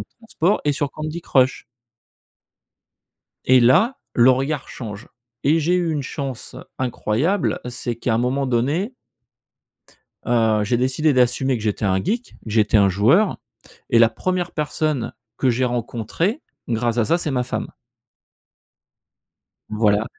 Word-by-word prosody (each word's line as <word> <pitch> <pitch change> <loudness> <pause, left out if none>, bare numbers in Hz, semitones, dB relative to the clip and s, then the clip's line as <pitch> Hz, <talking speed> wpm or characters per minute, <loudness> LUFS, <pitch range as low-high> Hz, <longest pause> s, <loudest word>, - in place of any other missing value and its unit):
de - - -6
transport, 210 -4 0
est 145 - +2
sur 140 0 -2
Candy 155 +2 -5
Crush. 130 -4 +2 1.8
Et 130 0 +6
là, 170 - +4 0.2
le 125 +2 +6
regard 135 +2 -1
change 105 -2 -8 0.4
et 155 +4 +4
j'ai 165 +3 +1
eu 175 -2 +1
une 150 -3 -2
chance 135 -4 -6 0.2
incroyable 130 - 0
c'est 120 -1 -4
qu'à 115 0 -1
un 115 - +1
moment 130 +3 0
donné 145 - 0 1.3
heu, 110 -3 +2
j'ai 120 +4 +1
décidé 130 +5 +1
d'assumer 130 +1 +2
que 110 - -7
j'étais 105 0 -1
un 95 -1 +1
geek, 235 - -3
j'étais 110 0 +2
un 100 -2 +5
joueur 120 - +3 0.5
et 115 - +4
la 115 - +6
première 175 +9 -2
personne 150 -3 -2 0.2
que 130 - +2
j'ai 125 +2 +1
rencontré, 125 - -2 0.3
grâce 120 0 -1
à 115 - +2
ça, 170 - +2
c'est 155 -4 -3
ma 125 -1 0
femme 125 - -5 2.0
voilà, 105 -1 +2
130 Hz, 140 wpm, -21 LUFS, 115-155 Hz, 2.0 s, Et